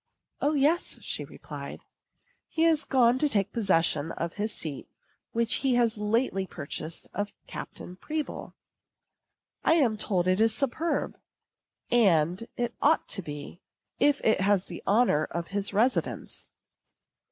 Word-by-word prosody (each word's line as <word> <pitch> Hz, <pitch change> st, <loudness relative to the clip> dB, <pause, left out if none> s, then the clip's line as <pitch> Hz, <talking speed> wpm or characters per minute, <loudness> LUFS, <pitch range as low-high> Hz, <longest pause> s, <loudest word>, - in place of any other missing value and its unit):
"O, 295 Hz, +2 st, +2 dB
yes," 300 Hz, +5 st, +2 dB
she -, -, -2 dB
replied, -, -, -9 dB, 0.7 s
"he 325 Hz, 0 st, +1 dB
is 320 Hz, -2 st, +3 dB
gone 250 Hz, -1 st, +4 dB
to 300 Hz, -, +3 dB
take 200 Hz, -5 st, +1 dB
possession 165 Hz, -7 st, +2 dB
of 170 Hz, 0 st, -4 dB
his 210 Hz, +2 st, -2 dB
seat 150 Hz, -8 st, -4 dB, 0.4 s
which 230 Hz, 0 st, +2 dB
he 265 Hz, -3 st, +2 dB
has 235 Hz, -2 st, +3 dB
lately 210 Hz, -2 st, 0 dB
purchased 155 Hz, +1 st, -6 dB
of 205 Hz, 0 st, -3 dB
Captain 180 Hz, -, -8 dB
Pribble. 305 Hz, +7 st, -5 dB, 1.1 s
I 325 Hz, -, +5 dB
am 245 Hz, -9 st, +3 dB
told 185 Hz, -4 st, 0 dB
it 185 Hz, +3 st, +3 dB
is 225 Hz, -1 st, +3 dB
superb; 285 Hz, +6 st, -1 dB, 0.7 s
and 185 Hz, -3 st, +3 dB
it 240 Hz, -1 st, -1 dB
ought 315 Hz, +3 st, +3 dB
to 195 Hz, -, -1 dB
be, 150 Hz, +2 st, -8 dB, 0.4 s
if 290 Hz, -1 st, +4 dB
it 220 Hz, -3 st, +3 dB
has 195 Hz, -1 st, +3 dB
the -, -, -8 dB
honor 200 Hz, -8 st, +3 dB
of 170 Hz, 0 st, -5 dB
his 200 Hz, 0 st, -2 dB
residence." 230 Hz, +6 st, 0 dB
215 Hz, 140 wpm, -28 LUFS, 185-260 Hz, 1.1 s, I